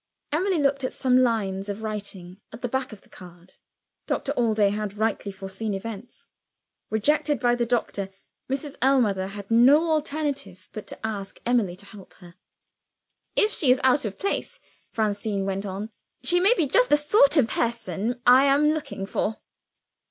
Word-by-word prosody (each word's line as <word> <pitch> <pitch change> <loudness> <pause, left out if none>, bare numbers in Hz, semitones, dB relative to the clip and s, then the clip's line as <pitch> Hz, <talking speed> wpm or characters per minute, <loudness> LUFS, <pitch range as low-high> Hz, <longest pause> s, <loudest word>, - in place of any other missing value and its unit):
Emily 360 +4 +1
looked 275 -2 +1
at 255 - -2
some 255 -1 +3
lines 205 -5 0
of 205 +2 -5
writing 200 -3 -6
at 225 +3 -11
the - - 0
back 265 +1 -2
of 210 -2 -11
the - - -24
card. 175 0 -15 0.5
Doctor 275 - -1
Allday 220 -6 +2
had 210 -1 -4
rightly 220 -2 -1
foreseen 195 +2 -5
events. 225 +3 -8 0.6
Rejected 295 +7 +1
by 245 -1 +2
the 240 -1 0
doctor, 215 -5 -1 0.4
Mrs. 275 +2 -4
Ellmother 230 -8 +2
had 200 +1 -9
no 285 +8 +5
alternative 285 - -3
but 215 - -7
to - - -7
ask 200 -3 -5
Emily 230 -7 +1
to 195 - -10
help 200 -2 -14
her. 175 -2 -15 1.0
"If 425 - +3
she 290 - +1
is 255 +1 +5
out 260 +2 +4
of 210 -3 -5
place," 445 +5 -3 0.3
Francine 205 -2 -1
went 195 +1 -3
on, 200 +4 -5 0.3
"she 355 0 +3
may 400 +7 +5
be 330 - +1
just - - +3
the 295 - +5
sort 295 0 +4
of 265 -6 +4
person 235 0 -2
I 255 +3 +7
am 285 +2 +4
looking 300 -10 -4
for." 215 +2 -2
230 Hz, 165 wpm, -25 LUFS, 200-275 Hz, 1.0 s, I